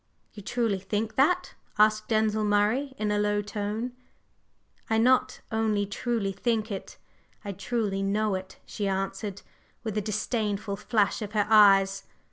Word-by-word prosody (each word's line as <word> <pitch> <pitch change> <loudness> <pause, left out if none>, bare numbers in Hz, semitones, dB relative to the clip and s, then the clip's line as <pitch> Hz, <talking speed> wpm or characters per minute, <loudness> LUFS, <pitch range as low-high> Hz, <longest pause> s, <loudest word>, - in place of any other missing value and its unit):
"You 210 - -9
truly 225 -1 -1
think 210 +3 -3
that?" 350 +7 +2 0.2
asked 215 0 +3
Denzil 215 -1 +1
Murray 210 +7 +1
in 210 -1 -1
a 210 - +1
low 205 0 +1
tone. 210 +3 -3 1.0
"I 220 - +2
not 255 +2 +3
only 220 -2 +1
truly 205 0 -2
think 220 +2 -1
it, 195 - -6 0.5
I 200 - -3
truly 200 0 -2
know 205 +1 0
it!" 190 0 -5
she 205 - -3
answered, 195 +1 -3 0.4
with 220 -3 -4
a 210 - +1
disdainful 210 -1 -2
flash 215 0 +1
of 210 0 -5
her 210 -2 +2
eyes. 195 -2 +6
210 Hz, 145 wpm, -27 LUFS, 200-225 Hz, 1.0 s, eyes